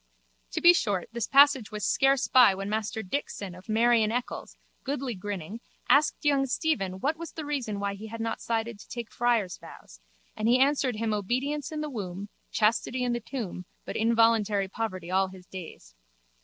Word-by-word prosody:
To - - -1
be 345 0 +9
short 205 - -1
this 235 -1 -3
passage 275 -4 +5
was 210 -1 -3
scarce 270 0 +3
by 245 -7 +6
when 195 +1 -5
Master 220 +1 -2
Dixon 200 -3 -4
of 180 +4 -14
Mary 230 +1 +4
in 215 0 +1
Eccles, 245 +1 -4 0.3
goodly 270 -2 -2
grinning, 200 +1 -6 0.3
asked 290 +3 +3
young 275 -2 +3
Stephen 255 - 0
what 305 +4 0
was 335 -1 -8
the 315 - -6
reason 255 -9 -3
why 200 0 -1
he 205 +2 -8
had 225 +1 -7
not 225 0 -3
cided 230 -1 -2
to - - -14
take 235 -2 -6
friar's 230 -7 0
vows - - -13 0.4
and 215 - -1
he 240 +2 +5
answered 270 -2 +2
him 220 0 -1
obedience 260 +9 -2
in 305 -1 -3
the 305 - -3
womb, 200 -3 -5 0.2
chastity 230 +3 +1
in 245 -1 0
the 240 - -1
tomb 220 -6 -6 0.2
but - - -6
involuntary 225 -3 +3
poverty 185 -4 -4
all 190 +1 +3
his 185 -1 -13
days. 170 - -10
225 Hz, 185 wpm, -28 LUFS, 200-260 Hz, 0.4 s, be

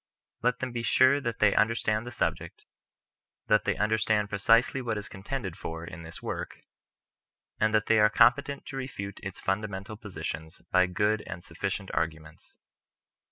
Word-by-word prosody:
Let 125 0 +2
them 130 -1 -2
be 120 -1 -3
sure 130 +4 +4
that 120 -3 -3
they 105 -2 +4
un 110 - +5
derstand 110 -1 -1
the 120 - -6
subject, 120 - -3 0.8
that 105 - +3
they - - +1
understand 105 -1 +1
precisely 115 +6 +3
what 115 -3 -2
is 105 - -5
contended 95 -2 -5
for 80 -5 -6
in 85 0 -9
this 80 0 -10
work, - - -5 1.0
and 110 0 +3
that 110 0 +2
they 110 - +4
are 105 - +7
vi - - -20
PREFACE. - - -12
competent 140 +4 +4
to 135 - -6
refute 100 -7 -5
its - - -6
fundamental 100 +1 -3
positions 80 -5 -6
by 95 0 +5
good 105 +4 +1
and 85 - -7
sufficient 95 +3 -4
arguments. 80 -1 -4
105 Hz, 170 wpm, -28 LUFS, 95-115 Hz, 1.0 s, are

